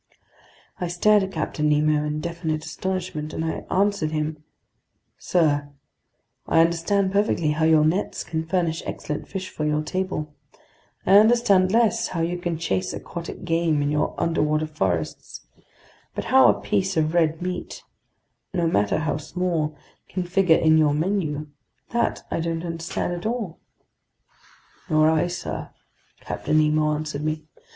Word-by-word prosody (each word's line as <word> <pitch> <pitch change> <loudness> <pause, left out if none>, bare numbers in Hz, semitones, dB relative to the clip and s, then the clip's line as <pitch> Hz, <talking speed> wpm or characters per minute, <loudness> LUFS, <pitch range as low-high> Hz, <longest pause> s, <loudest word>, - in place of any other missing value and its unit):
I 180 - -1
stared 205 +5 +4
at 190 0 -3
Captain 150 -1 -1
Nemo 150 0 +3
in 150 0 -2
definite 160 -2 -3
astonishment, 180 -5 -4
and 160 - -2
I 160 - -3
answered 200 -4 +1
him: 155 0 -3 0.8
"Sir, 145 -5 +1 0.8
I 165 - +5
understand 170 +4 +1
perfectly 200 -6 +1
how 155 +1 +1
your 160 -1 +5
nets 180 +6 0
can 160 -1 -3
furnish 165 -1 -1
excellent 150 - -5
fish 190 -1 -5
for 155 - -4
your 150 0 +1
table; 155 -3 -3 0.7
I 195 +2 +7
understand 215 -4 +4
less 230 +1 +3
how 170 - -3
you 175 +2 -1
can 175 -2 -2
chase 95 - -1
aquatic 170 0 -7
game 165 -3 +1
in 145 - 0
your 150 0 0
underwater 155 -2 +1
forests; 95 - -3 0.7
but - - -3
how - - +8
a - - +2
piece 100 - 0
of 155 0 +1
red 160 -2 +2
meat, 180 0 -5 0.7
no 175 -2 +1
matter 105 -11 +2
how 155 -2 -1
small, 155 -1 -2 0.3
can 185 0 -2
figure 180 -2 +3
in 160 0 +4
your 150 -2 +3
menu, 155 -3 -1 0.5
that 235 0 0
I - - 0
don't 165 +1 -2
understand 165 +1 -3
at 175 +4 -3
all." 225 -8 -3 1.3
"Nor 155 0 +4
I, 160 +2 +2
sir," 175 0 -5 0.5
Captain 155 - -1
Nemo 155 0 +3
answered 150 -1 -3
me. 155 0 -2
160 Hz, 145 wpm, -24 LUFS, 155-180 Hz, 1.3 s, how